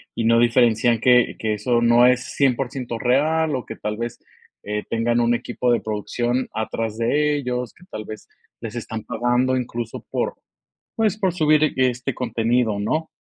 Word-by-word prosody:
Y 115 - -1
no 115 +1 +4
diferencian 120 -1 +3
que 125 -1 +4
que 110 -1 -1
eso 120 +2 +1
no 120 +1 +5
es 125 0 +2
100% 125 -3 0
real, 150 +5 +1
o 125 - -4
que - - -7
tal 105 +1 -4
vez, 120 0 -5 0.4
eh, 105 0 -3
tengan 115 +1 +1
un 120 0 +2
equipo 120 +1 -1
de 120 - +2
producción 120 +4 -2
atrás 110 0 -3
de 150 +6 +1
ellos, 125 -3 -3
que 180 - -19
tal 110 - -6
vez 110 0 -9 0.3
les 115 0 -6
están 110 -2 -5
pagando, 120 +3 +1
incluso 120 -2 -5
por, - - -1 0.6
pues, 215 -2 +1
por 190 -4 +1
subir 155 -2 +3
este 130 0 0
contenido, 115 -2 0
¿no? 155 +10 -1
120 Hz, 170 wpm, -22 LUFS, 115-130 Hz, 0.6 s, no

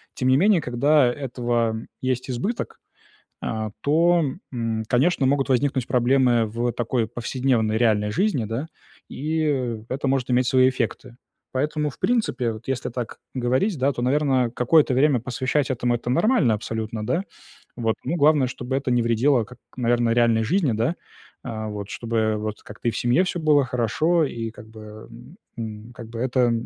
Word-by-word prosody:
Тем 130 - 0
не 130 - +5
менее, 195 +2 +4
когда 135 +3 +3
этого 120 -4 -1 0.3
есть 130 -1 -1
избыток, 195 - -3 0.6
э, 110 -1 -3
то, 170 +3 +3 0.3
м, 115 -2 -2
конечно, 135 +3 +2
могут 135 0 +1
возникнуть 130 -1 +1
проблемы 125 -2 +3
в 120 +3 -1
такой 120 0 -1
повседневной, 120 -3 0
реальной 105 -3 +2
жизни, 165 - 0
да, 115 +8 -4 0.4
и, 155 +3 -2
э, 125 -7 -1
это 135 +1 -2
может 130 -2 0
иметь 125 +1 +3
свои 130 0 +5
эффекты. 125 -1 -4 0.4
Поэтому, 150 +3 -1
в - - -18
принципе, 135 - 0
вот, 110 +1 -11
если 135 -2 -2
так 120 -2 -6 0.2
говорить, 130 - +1
да, 135 +2 +2
то, 120 - -5
наверное, 130 -2 +2
какое-то 130 +4 +3
время 135 -1 +3
посвящать 130 +4 -1
этому- 120 -1 0
это 120 +1 -5
нормально 155 - +3
абсолютно, 110 0 -4
да. 170 - 0 0.5
Вот, 115 -2 0
ну, 170 - -1
главное, 150 -3 +4
чтобы 125 +1 -4
это 135 -1 -2
не 120 -1 +3
вредило, 115 +2 +2
как, 125 +3 -14 0.2
наверное, 120 -1 +2
реальной 115 -2 +3
жизни, 165 - +1
да, 115 +10 0 0.5
а, 110 -3 -5
вот, 105 -1 -6
чтобы, 115 -1 -3
э, 110 -1 +2
вот, 105 0 -5
как-то 105 +3 -7
и - - -1
в 110 - -5
семье 120 +9 +3
всё 180 -1 -3
было 150 -3 +3
хорошо, 130 +8 +1
и 115 -4 -4
как 110 -1 -13
бы, 110 -1 -11 0.5
эм, 110 0 -7
как 120 -2 -10
бы 115 0 -7
это 125 -1 +2
125 Hz, 170 wpm, -23 LUFS, 115-140 Hz, 0.6 s, не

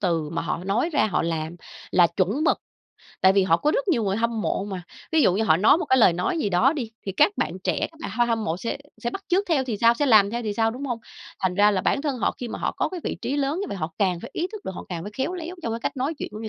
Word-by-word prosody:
từ 165 -5 0
mà 165 - -2
họ 170 +1 -3
nói 225 - 0
ra, 290 - +3
họ 200 - 0
làm 165 0 -3 0.3
là 175 -1 +5
chuẩn 205 - 0
mực. - - +3 0.6
Tại 190 0 +6
vì 195 -1 +4
họ 165 -3 +4
có 300 - +1
rất - - -1
nhiều 240 - +2
người 195 +1 0
hâm 230 -1 0
mộ 195 - -1
mà. 190 -3 -5 0.3
Ví 320 - +4
dụ 180 - +4
như 220 +2 +1
họ 160 -6 +4
nói 220 - +5
một 350 - -2
cái 260 - +3
lời 200 -6 +6
nói 180 - -1
gì 210 - 0
đó 220 +10 +3
đi, 250 -8 -4 0.2
thì 195 - -2
các 400 - +4
bạn - - -1
trẻ, - - 0
các 320 - -20
bạn - - -5
ha 240 +1 +2
hâm 225 -2 0
mộ 165 -4 -1
sẽ 230 - -3 0.3
sẽ 240 - -1
bắt 390 - -7
chước 380 +3 +2
theo 285 -5 +2
thì 235 -5 -3
sao, 230 +2 +5
sẽ 290 +3 0
làm 210 -4 +6
theo 240 +1 -3
thì 210 -2 -2
sao, 225 0 +2
đúng 260 +5 -6
hông? 240 -3 -2 0.4
Thành 185 -2 0
ra 205 +1 +5
là 190 -2 +1
bản 280 - 0
thân 280 -5 -2
họ - - +1
khi 245 - -5
mà - - -5
họ - - -1
có - - 0
cái 365 - -6
vị - - -2
trí 280 - -1
lớn 290 +5 0
như 405 - -2
vậy, - - -4
họ 165 -2 -4
càng 185 -4 +1
phải - - -9
ý 345 - -1
thức 430 - -8
được, 190 - -4
họ - - -7
càng 170 -2 -4
phải 210 - -7
khéo 275 +8 -1
léo 350 +1 -6
trong 225 - -2
cái 230 - -4
cách - - -2
nói 275 +5 -1
chuyện - - -4
cũng 215 - -7
như 220 - -4
225 Hz, 325 wpm, -24 LUFS, 190-280 Hz, 0.6 s, Tại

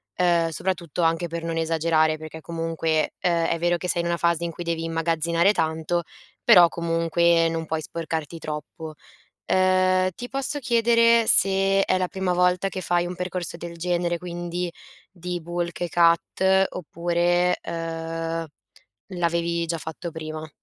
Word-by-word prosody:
ehm, 170 -2 +2
soprattutto 170 0 -3
anche 165 +1 +1
per 165 0 -5
non 165 0 -3
esagerare, 160 -1 +2
perché 155 0 -9
comunque, 165 -1 -1
uhm, 170 -2 +2
è 165 - 0
vero 175 0 +1
che 180 - -5
sei 170 - +1
in 170 - -3
una 170 0 0
fase 170 0 +1
in 170 - -3
cui 175 - -7
devi 165 -1 -2
immagazzinare 165 +2 +1
tanto, 160 +1 -1 0.4
però 180 -7 +8
comunque 165 0 +2
non 165 0 -3
puoi 160 0 -2
sporcarti 165 0 -5
troppo. 155 +1 -7 0.5
Uhm, 185 0 +3
ti 245 +1 -7
posso 275 +2 -2
chiedere 230 -1 +4
se 195 0 +4
è 185 - +2
la 185 -1 0
prima 190 -2 -1
volta 180 +2 +2
che 185 - -5
fai 175 0 +1
un 180 - -5
percorso 180 -1 -4
del 170 0 -8
genere, 175 0 -1
quindi 175 0 -4 0.4
di 180 -1 -5
bulk 175 +1 -4
e 175 - -1
cut 190 +3 +3
oppure, 175 +1 0
uhm, 165 0 -4 0.6
l'avevi 170 -2 -1
già 165 0 -2
fatto 160 +2 -6
prima? 155 0 -7
170 Hz, 155 wpm, -24 LUFS, 165-180 Hz, 0.6 s, però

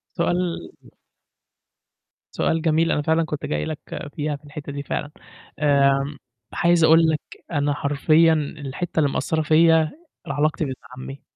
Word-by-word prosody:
سؤال 175 0 0 1.7
سؤال 160 0 0
جميل 165 0 +2
أنا 150 - +1
فعلًا 160 +2 +2
كنت 150 -1 -5
جاي 75 0 -2
لك 155 - -5 0.4
فيها، 150 -1 -2
في 145 - -14
الحتّة 145 0 -8
دي 140 0 -5
فعلًا 145 +1 -4 0.5
آمم، 140 -1 +2 0.4
عايز 170 -1 +3
أقول 160 +1 +6
لك، 155 -1 0 0.3
أنا 145 -1 +1
حرفيًا 155 +3 +3
الحتّة 150 +2 -3
اللي 145 -2 +3
مأثّرة 160 -1 -1
فيَّ 160 +2 +5
ال 305 - -8
علاقتي 155 +2 0
بابن 130 -1 -4 0.2
عمّي 135 +1 -8
155 Hz, 145 wpm, -23 LUFS, 145-165 Hz, 1.7 s, أقول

